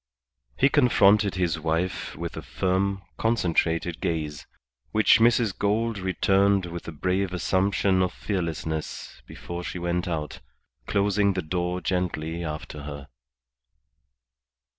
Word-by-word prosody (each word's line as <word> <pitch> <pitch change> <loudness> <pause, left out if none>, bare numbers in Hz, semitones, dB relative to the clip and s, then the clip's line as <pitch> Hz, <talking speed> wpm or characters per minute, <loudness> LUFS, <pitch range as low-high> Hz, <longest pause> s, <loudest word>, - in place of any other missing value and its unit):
He - - +5
confronted 105 -8 +4
his 85 -3 0
wife 80 +3 -2
with - - -5
a - - -5
firm, 95 +1 -1 0.2
concentrated 85 -6 +1
gaze, 75 -3 -3 0.4
which 110 +1 +5
Mrs. 115 -3 +3
Gould 110 +1 0
returned 95 +1 +2
with 85 0 -7
a - - -4
brave 90 +4 -1
assumption 95 +1 +1
of 90 - +1
fearlessness 80 -5 -4
before 85 0 -7
she 90 - -5
went 90 +1 -1
out, 80 -4 -3 0.5
closing 100 0 +2
the 95 - -2
door 90 +2 -2
gently 85 -2 -2
after 75 -1 -6
her. 70 -1 -8
90 Hz, 120 wpm, -26 LUFS, 85-100 Hz, 0.5 s, He